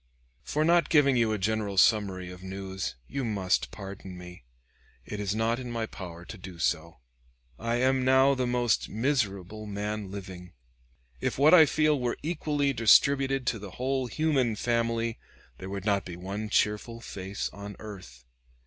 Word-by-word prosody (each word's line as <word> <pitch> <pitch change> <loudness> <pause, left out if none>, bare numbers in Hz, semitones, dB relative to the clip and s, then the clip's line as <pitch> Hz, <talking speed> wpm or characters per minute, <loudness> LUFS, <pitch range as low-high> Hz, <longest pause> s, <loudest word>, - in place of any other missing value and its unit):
For 150 - 0
not 170 +1 +4
giving 140 -4 +5
you 115 -2 +2
a 110 - 0
general 105 0 -1
summary 95 -4 +3
of 90 0 -11
news, 95 -2 -5
you 140 0 -3
must 100 -5 0
pardon 95 -2 -9
me; 90 -6 -11 0.6
it 105 - -6
is 100 0 -1
not 115 +2 +1
in 125 -1 -6
my 115 -1 -2
power 85 -5 -9
to 110 - -9
do 90 -1 -9
so. 85 0 -1 0.6
I 115 +1 -1
am 130 +1 +2
now 130 +1 +5
the 130 -2 -1
most 120 -2 +1
miserable 110 -5 -1
man 105 0 -4
living. 95 -2 -8 0.7
If - - -2
what 145 +5 +6
I 160 -4 +9
feel 155 -1 +2
were 125 -1 -1
equally 150 -3 0
distributed 135 +3 +4
to 115 - 0
the 100 -1 -8
whole 130 0 -1
human 135 -4 +1
family, 115 0 0 0.4
there 95 - -7
would 100 0 -5
not 100 -2 +2
be 90 - -7
one 100 +4 -5
cheerful 105 +2 0
face 95 -3 -5
on 100 0 -8
earth. 90 - -11
110 Hz, 165 wpm, -28 LUFS, 95-130 Hz, 0.7 s, I